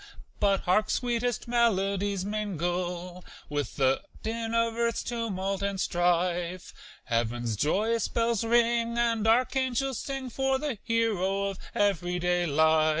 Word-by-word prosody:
But 200 -2 +2
hark! 210 +4 +2
sweetest 240 -1 -1
melodies 200 -4 +1
mingle 180 -3 -3 0.3
With 145 -1 -3
the 135 -1 +2 0.2
din 225 +1 -2
of 230 0 +2
earth's 235 0 -1
tumult 195 -5 -2
and 200 -1 -2
strife 175 0 0 0.3
Heaven's 120 0 -1
joyous 210 - +1
bells 230 -1 0
ring 235 0 +2
and 230 -2 +1
archangels 260 +2 +1
sing 270 -2 -5
For 265 +2 +1
the 275 -6 -3
hero 205 -5 +1
of 195 - -10 0.2
every 180 -3 +1
day 175 0 +1
life. 155 +1 +4
200 Hz, 125 wpm, -28 LUFS, 175-230 Hz, 0.3 s, life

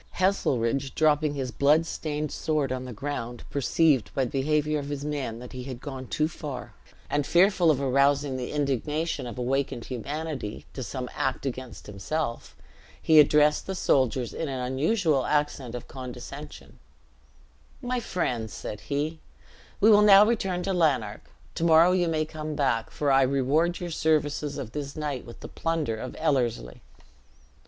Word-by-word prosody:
Heselrigge, 135 -8 0
dropping 150 -1 +2
his 130 -3 -3
blood 145 +7 +3
stained 150 -2 -3
sword 150 -4 -1
on 130 0 -3
the 125 - -7
ground, 120 -1 -5
perceived 140 -1 +2
by 135 - +2
the 120 - -6
behavior 150 +2 +1
of 140 0 -6
his 145 0 -4
men 140 -6 -3
that 125 +1 -10
he 125 -1 -6
had 130 -3 -6
gone 130 -1 -7
too 155 +5 0
far, 145 -5 -7 0.3
and 145 0 0
fearful 175 +2 +4
of 145 -4 +3
arousing 140 +1 +2
the 125 -1 -4
indignation 150 +1 -1
of 120 - -7
awakened 125 -1 -1
humanity, 140 -2 -5
to 130 - -6
some 125 +3 -4
act 135 +1 -2
against 130 -3 -6
himself, 115 +6 -4 0.4
he 160 -1 +5
addressed 150 0 +4
the 190 - -3
soldiers 130 -7 +1
in 160 - -3
an 130 -1 -3
unusual 140 - +1
accent 140 -4 -1
of 120 - -7
condescension: 130 +3 -9 1.0
"My 250 -1 -2
friends," 125 - -2
said 105 - -6
he, 150 +3 -3 0.6
"we 220 +2 +6
will 210 0 +7
now 205 0 +8
return 195 -6 0
to 195 - -1
Lanark; 135 - 0 0.2
to 165 - -3
morrow 165 +1 +6
you 180 -1 +2
may 155 -1 0
come 155 -1 -6
back, 125 -6 0
for 145 -2 0
I 135 0 +5
reward 140 +6 +1
your 175 -1 -5
services 150 -2 0
of 130 -6 -6
this 140 0 -5
night 145 -5 -4
with 120 - -12
the - - -7
plunder 165 -8 -2
of 125 +3 -6
Ellerslie." 120 - -1
145 Hz, 165 wpm, -27 LUFS, 130-155 Hz, 1.0 s, now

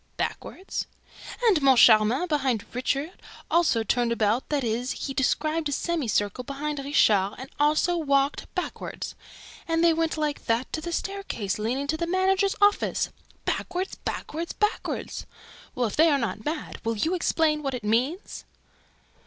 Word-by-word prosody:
"BACKWARD?" 380 - -4 0.6
"And 390 -9 +4
Moncharmin, 245 +1 +6
behind 265 - 0
Richard, 275 +7 -2 0.3
also 325 -10 +3
turned 235 +2 +1
about; 225 +2 +1
that 290 -3 0
is, 240 +2 -1
he 275 - -3
described 310 +4 0
a - - -3
semicircle 250 - -1
behind 285 +3 -4
Richard 210 -8 +3
and 260 +1 -9
also 305 +4 +3
WALKED 280 -2 +1
BACKWARD!... - - -4 0.5
And 330 0 +1
they 335 -1 +6
went 325 0 0
LIKE 300 -1 -2
THAT 230 +3 0
to 315 - -2
the 345 +2 -5
staircase 340 - -3
leading 250 +6 -1
to 310 +2 -1
the 340 +1 -2
managers' 380 +2 +2
office: 410 0 +2 0.4
BACKWARD, 370 +1 -2
BACKWARD, 330 +3 -4
BACKWARD!... 420 +1 -2 0.5
Well, 250 - +1
if 215 - -3
they 325 +2 +5
are 285 - +3
not 225 -4 -3
mad, 305 +1 -4
will 230 -1 -1
you 320 - +1
explain 320 -3 +1
what 275 -3 -2
it 240 - -6
means?" 255 - -1
285 Hz, 150 wpm, -26 LUFS, 240-330 Hz, 0.6 s, Moncharmin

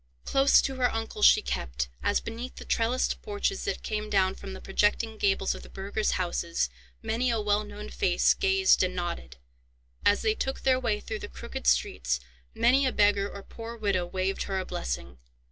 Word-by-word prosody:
Close 275 +1 +5
to 265 -1 -2
her 250 -2 +2
uncle 225 -1 -4
she - - +7
kept, 65 0 -2
as - - +2
beneath 235 +3 -7
the - - -9
trellised 235 +3 0
porches 405 -2 -2
that 400 - -3
came 215 -1 -3
down 190 -2 +3
from 195 0 -8
the 190 - -8
projecting 210 +3 +1
gables 195 -2 +1
of - - -9
the - - -13
burghers' 200 +2 -2
houses 170 - -1 0.3
many 245 +3 0
a 230 -2 +1
well 210 0 +1
known 210 0 -8
face - - +2
gazed 385 0 +3
and 185 0 0
nodded, 65 - -4 0.7
as 205 - +3
they 435 - +3
took 265 -11 -3
their 260 -1 +3
way 225 -5 0
through 215 0 -5
the 205 - -6
crooked - - -7
streets, 60 0 +2 0.4
many 260 +4 +4
a - - +1
beggar 205 -2 +3
or 200 - -9
poor 230 +2 -8
widow 200 -5 0
waved 190 +2 -2
her 195 - -2
a 185 - -2
blessing. 65 +1 -5
210 Hz, 190 wpm, -28 LUFS, 185-235 Hz, 0.7 s, she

